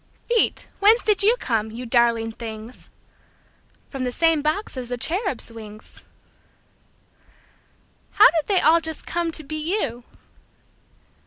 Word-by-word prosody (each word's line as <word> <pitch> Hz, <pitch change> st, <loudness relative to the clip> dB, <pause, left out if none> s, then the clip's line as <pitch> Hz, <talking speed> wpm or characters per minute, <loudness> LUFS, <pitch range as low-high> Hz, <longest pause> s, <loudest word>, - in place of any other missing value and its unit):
Feet, 475 Hz, -1 st, +1 dB
whence 430 Hz, +4 st, +4 dB
did 420 Hz, -3 st, +3 dB
you 435 Hz, +4 st, +4 dB
come, 220 Hz, -, -2 dB
you 235 Hz, +3 st, -8 dB
darling 230 Hz, -1 st, +2 dB
things? 225 Hz, +1 st, -9 dB, 1.0 s
From 270 Hz, -2 st, -6 dB
the 250 Hz, -, -2 dB
same 325 Hz, +2 st, +2 dB
box 310 Hz, +7 st, -2 dB
as 250 Hz, -2 st, -6 dB
the 245 Hz, -, -3 dB
cherubs' 320 Hz, -, -2 dB
wings. 215 Hz, -1 st, -12 dB, 2.1 s
How -, -, +8 dB
did 320 Hz, -3 st, -1 dB
they 390 Hz, -3 st, +3 dB
all 330 Hz, +1 st, +4 dB
just 320 Hz, -1 st, -4 dB
come 340 Hz, -1 st, -2 dB
to 315 Hz, -, -2 dB
be 310 Hz, +2 st, -5 dB, 0.2 s
you? 240 Hz, -, -3 dB
275 Hz, 135 wpm, -22 LUFS, 230-340 Hz, 2.1 s, How